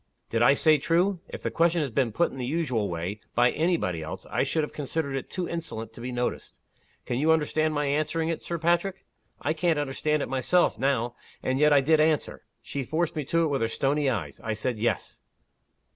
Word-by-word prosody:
Did 115 - +1
I 130 +4 +6
say 155 0 +4
true?' 175 +5 +2
If - - -8
the - - -1
question 170 -1 +2
had 135 -6 -4
been 130 -3 +1
put 170 +11 +1
in 135 - -9
the 125 - -2
usual 130 -9 0
way, 90 +5 -4 0.2
by 120 +1 +5
any 170 +3 +1
body 90 - -2
else, 80 - -7
I - - +1
should 160 - +1
have 150 - -5
considered 145 -1 -3
it 135 - -4
too 180 -1 -3
insolent 115 -10 -5
to 120 - -11
be 125 +1 -4
noticed. 125 0 -3 0.5
Can 120 - -1
you 155 +3 +4
understand 155 0 +1
my 145 0 +1
answering 155 +3 0
it, 165 -1 -2
Sir 170 - -3
Patrick? 175 +3 0 0.4
I 155 - +1
can't 165 0 +1
understand 145 +1 0
it - - -4
myself, 135 +2 +2
now 120 -3 0 0.3
and 130 +1 0
yet 150 0 +5
I 145 -1 +6
did 155 +3 +3
answer. 155 -1 +1 0.2
She 140 - -4
forced 160 +6 -1
me 155 - -1
to 165 +4 +2
it 160 - +1
with 140 -3 0
her 115 - +2
stony 140 +4 +1
eyes. 85 - -3
I 110 -1 -2
said 110 +1 -2
'yes. 110 -3 -2
145 Hz, 220 wpm, -27 LUFS, 120-160 Hz, 0.5 s, I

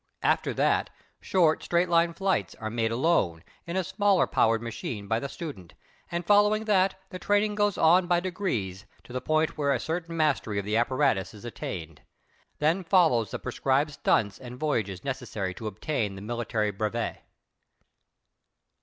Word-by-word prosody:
After - - +2
that, - - +2 0.3
short, 170 -5 +2
straight 175 +1 +1
line 170 0 +2
flights 190 - 0
are 110 0 -5
made 115 -1 0
alone 115 - +1 0.2
in 170 +2 -2
a 190 - +1
smaller 200 0 +2
powered 115 0 +2
machine 110 -2 -5
by 115 +2 +1
the 140 - -5
student, 135 - -8 0.4
and, 170 0 -2
following 210 +2 +4
that, 195 -3 +3 0.2
the 185 - -6
training 205 +2 +2
goes 205 -1 +1
on 175 +3 +5
by 175 -1 +3
degrees 120 - -3 0.2
to 125 - -12
the 130 - -2
point 155 0 0
where 140 -1 +2
a 135 - +1
certain 165 +3 -4
mastery 145 -9 +1
of 100 - -2
the 105 +1 -1
apparatus 120 -4 +1
is 105 - -12
attained. 80 -9 -6 0.6
Then 165 +5 +1
follows 165 - +3
the - - -4
prescribed 135 +3 0
"stunts" 105 -7 +1
and 125 0 -9
voyages 105 - -1
necessary 120 -8 -3
to 110 +4 -6
obtain 105 0 -2
the 95 - -9
military 110 -2 -1
brevet. 110 +3 -3
135 Hz, 165 wpm, -27 LUFS, 110-175 Hz, 0.6 s, on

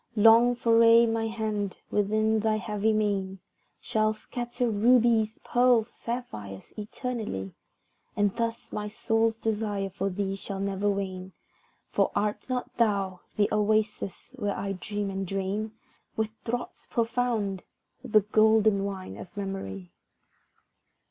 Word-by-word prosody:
Long 230 +3 +6
foraye 230 0 +6
my 225 0 0
hand, 215 -3 -2
within 215 +2 +2
thy 220 0 +1
heavy 210 +1 0
mane, 200 -3 0 0.4
Shall 215 0 +1
scatter 240 +2 -3
rubies, 225 0 +3
pearls, 245 -2 +3
sapphires 105 - -6
eternally, 210 - -4 0.6
And 205 -1 +1
thus 230 -1 -3
my 210 0 -3
soul's 225 +1 +1
desire 210 -3 -2
for 195 +1 -2
thee 195 +1 -2
shall 195 0 -6
never 200 +1 0
wane; 190 -2 -3 0.6
For - - +2
art 210 +4 -1
not 250 -1 -3
thou 200 -5 +1 0.2
the 205 -1 +4
oasis 210 -1 0
where 205 -3 -1
I 195 - -2
dream 200 +1 -3
and 195 0 -3
drain 195 +3 -2 0.4
With 220 0 -1
draughts 245 +1 -4
profound, 230 -5 0 0.4
the 215 -4 +4
golden 215 -1 +4
wine 190 - -5
of 180 - -11
memory? 95 - -5
210 Hz, 120 wpm, -28 LUFS, 195-225 Hz, 0.6 s, Long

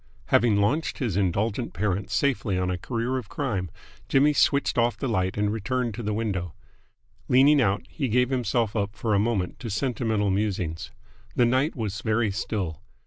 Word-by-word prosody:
Having 115 -2 +4
launched 125 +11 +1
his 115 - -2
indulgent 100 +5 0
parent 95 0 -1
safely 110 -3 0
on 90 0 0
a 90 - -2
career 120 +5 -2
of 115 - -10
crime, 105 - -2 0.4
Jimmy 145 +2 +4
switched 140 0 +2
off 120 0 +2
the 135 - -2
light 95 -5 0
and 105 0 +1
returned 120 +2 -1
to 120 - -6
the 105 -1 -2
window. 100 -6 -2 0.7
Leaning 140 +3 +5
out, 100 -1 +1
he 140 -4 -3
gave 125 +2 +2
himself 120 -3 0
up 100 -1 -1
for 110 -2 -1
a 100 - +4
moment 105 -4 -1
to 115 - -5
sentimental 110 -2 0
musings. 95 -5 -2 0.5
The 120 - +4
night 130 +6 +1
was 105 -4 -3
very 110 0 +1
still. 95 -5 -3
110 Hz, 175 wpm, -26 LUFS, 100-125 Hz, 0.7 s, Leaning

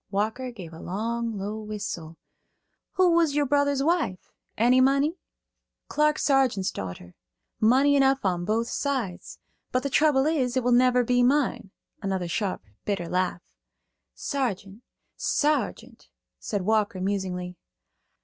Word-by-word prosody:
Walker 220 +6 -2
gave 180 -8 -10
a 160 - -10
long, 225 +4 -3
low 205 +3 -4
whistle. 200 -7 -6 0.8
"Who 370 -2 +4
was 335 -4 +3
your 295 -1 +2
brother's 285 0 +2
wife? 320 - -1 0.3
Any 245 +3 +4
money?" 280 +6 +2 0.7
"Clark 300 0 +2
Sargeant's 260 -9 +2
daughter. 90 -2 -7 0.5
Money 265 +6 +4
enough 270 -3 +3
on 175 -2 0
both 225 +5 0
sides; 250 -12 -3 0.3
but 255 - 0
the 280 - -2
trouble 290 -2 +3
is, 265 -6 0
it 255 - +1
will 245 - +2
never 250 0 +4
be 245 +1 +2
mine." 260 -5 +1 0.3
Another 190 -3 -2
sharp, 190 +3 -2 0.2
bitter 195 -4 -2
laugh. 180 0 -1 0.7
"Sargeant, 210 -7 -3 0.4
Sargeant," 300 +1 -1 0.3
said 205 -3 -3
Walker, 210 -2 +1
musingly. 185 -2 -3
235 Hz, 130 wpm, -26 LUFS, 195-275 Hz, 0.8 s, Who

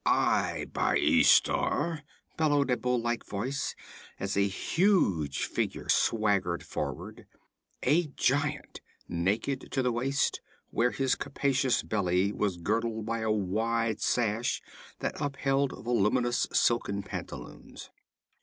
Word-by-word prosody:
'I, - - +1
by - - +2
Ishtar!' 165 -3 +3 0.3
bellowed 145 -4 +2
a 125 - +2
bull 125 -1 0
like 120 0 -2
voice, 130 +7 -3 0.4
as 95 0 -2
a 100 0 +3
huge 100 - +1
figure - - -3
swaggered 100 -6 +2
forward: - - -6 0.6
a 155 +5 +3
giant, 145 +1 -1 0.3
naked 100 +10 -1
to 135 - 0
the 125 - +2
waist, 135 +4 0 0.3
where 120 +1 +2
his 135 +1 0
capacious 135 -2 0
belly 95 -1 +1
was 100 -3 -1
girdled 110 +4 -1
by 115 +1 -2
a 110 0 -1
wide 110 +2 0
sash 120 +1 0 0.4
that - - -3
upheld 140 -1 0
voluminous 120 +1 +1
silken 100 -4 +1
pantaloons. - - -8
115 Hz, 115 wpm, -29 LUFS, 100-135 Hz, 0.6 s, Ishtar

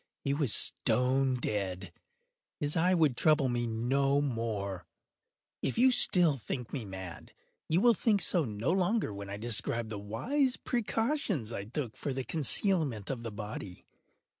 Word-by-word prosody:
He 140 - 0
was 140 -5 +1
stone 130 +5 +3
dead. 100 -5 -3 0.7
His 145 0 -2
eye 180 +3 +3
would 155 -7 +2
trouble 150 -1 +3
me 120 -1 -1
no 135 +5 +1
more. 110 - -3 0.7
If - - -2 0.2
still 180 -8 +3
you 140 - -4
think 120 +2 -6
me 130 -6 -4
mad, 95 -3 -9 0.4
you 170 +4 +2
will 240 +1 +6
think 210 0 +1
so 175 -3 +2
no 110 +3 -2
longer 190 - 0
when 100 0 -8
I 100 - -5
describe 115 0 +1
the 105 -2 -5
wise 250 - 0
precautions 225 - -1
I 100 - -5
took 120 0 -5
for 140 - -4
the 130 0 -3
concealment 150 - +1
of 125 -3 -5
the 115 -1 -6
body. 105 -3 -8
130 Hz, 155 wpm, -30 LUFS, 110-160 Hz, 0.7 s, will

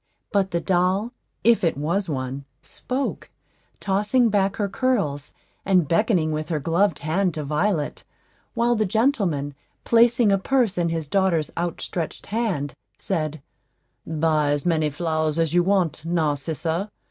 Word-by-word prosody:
But 200 -3 +1
the 170 -2 -1
doll, 190 +5 +1 0.3
if 235 -3 +4
it 165 -5 +1
was 170 +6 -1
one, 135 -1 -4 0.2
spoke, 265 +2 -4 0.5
tossing 210 +5 +2
back 200 -1 +1
her 205 - -1
curls, 195 - -1 0.3
and 185 -5 +3
beckoning 170 - +2
with 155 +1 -3
her 160 -3 0
gloved 170 +3 +1
hand 180 +2 +1
to 155 - -3
Violet, 150 +2 -1 0.5
while 235 +1 +2
the 215 -3 +1
gentleman, 190 - +1 0.3
placing 235 -1 +4
a 195 - +3
purse 240 -2 +1
in 170 -1 0
his 165 -2 -3
daughter's 175 -3 +1
outstretched 170 -1 -3
hand, 200 - -2 0.2
said, 155 -6 -3 0.6
"Buy 155 -2 +1
as 145 +2 -2
many 160 -3 +2
flowers 155 0 -1
as 165 -1 +1
you 175 - +5
want, 180 -5 +1
Narcissa. 160 +3 -1
175 Hz, 140 wpm, -23 LUFS, 155-205 Hz, 0.6 s, you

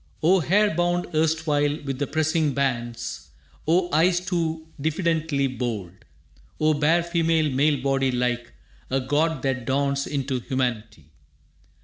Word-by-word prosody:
O 185 +4 +5
hair 205 +5 +3
bound 175 +1 +1
erstwhile 155 -2 +1
with 135 -2 -4
the 145 - -1
pressing 155 -1 0
bands! 120 -4 -2 0.4
O 175 +2 +3
eyes 175 +3 +4
too 165 -3 -2 0.2
diffidently 160 -2 0
bold! 120 -8 -3 0.7
O 155 0 +3
bare 155 +4 +2
female 165 -3 +1
male 145 +2 +2
body 135 -1 +1
like 125 -1 -1 0.4
A 135 - +1
god 145 +2 0
that 130 -3 -1
dawns 140 +1 0
into 135 -2 -2
humanity! 115 - -3
145 Hz, 125 wpm, -24 LUFS, 130-160 Hz, 0.7 s, O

